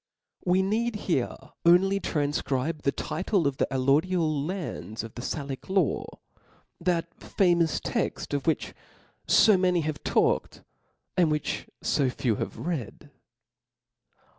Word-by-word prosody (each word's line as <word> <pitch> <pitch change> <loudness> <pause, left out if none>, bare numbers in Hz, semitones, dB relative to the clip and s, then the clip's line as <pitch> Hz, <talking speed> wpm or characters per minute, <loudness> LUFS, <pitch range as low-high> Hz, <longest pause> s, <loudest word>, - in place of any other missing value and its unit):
We 185 +1 +3
need 220 +4 0
here 135 -9 0 0.3
only 190 +3 +5
tranfcribe 145 -2 -1
the 140 - +1
title 190 +1 -1
of 140 -1 0
the - - +1
Jlh^ 130 -1 -1 0.2
lodial 160 -5 -1
lands 155 - -5
of 115 - -9
the 120 - -7
Salic 140 +2 -5
law, 190 -7 +1 0.8
chat 170 -1 0
famous 175 -4 +2
textof 145 +2 -2
which 160 - 0 0.5
fo 215 -3 +6
many 180 -2 +2
have 155 -1 -4
talked, - - +1 0.5
and 175 -3 +4
which 150 -1 -2
fo 140 -3 +2
few 120 -3 -1
have - - -4
read. 155 - -5
165 Hz, 125 wpm, -27 LUFS, 140-185 Hz, 0.8 s, fo